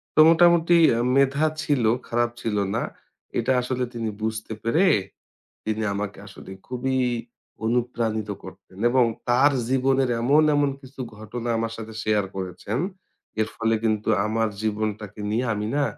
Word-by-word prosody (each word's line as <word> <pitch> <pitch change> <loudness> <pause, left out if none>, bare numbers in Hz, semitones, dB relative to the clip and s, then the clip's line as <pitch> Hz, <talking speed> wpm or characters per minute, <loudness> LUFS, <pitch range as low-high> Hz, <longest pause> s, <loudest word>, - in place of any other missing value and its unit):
তো - - +2
মোটামুটি 170 0 +5 0.2
আ - - 0 0.2
মেধা 140 +2 +3 0.2
ছিল, 140 -5 +1 0.2
খারাপ 120 0 +1
ছিল 105 -2 -1 0.2
না। - - 0 0.6
এটা 120 +3 +1
আসলে 125 0 -2
তিনি 115 -2 -3
বুঝতে 110 0 -3
পেরে, 160 +12 +3 0.8
তিনি 110 0 -1
আমাকে 100 -1 -4
আসলে 100 -1 -12 0.2
খুবই 130 +1 -1 0.7
অনুপ্রাণিত 115 -2 -1
করতেন 95 - -13
এবং 125 0 +4 0.2
তার 130 +4 +5 0.2
জীবনের 130 0 +2
এমন 145 +6 +5
এমন 145 -1 +3
কিছু 135 0 -13 0.2
ঘটনা 115 +3 -6
আমার 115 0 -2
সাথে 110 -1 -8
শেয়ার 105 -2 +1
করেছেন, 95 +4 -4 0.6
এর 110 - +1
ফলে 115 0 +1
কিন্তু 110 -1 0 0.2
আমার 110 +1 +1
জীবনটাকে 105 -1 -3
নিয়ে 120 +4 0
আমি 105 0 -3
না 145 - +2
115 Hz, 145 wpm, -24 LUFS, 110-130 Hz, 0.8 s, মোটামুটি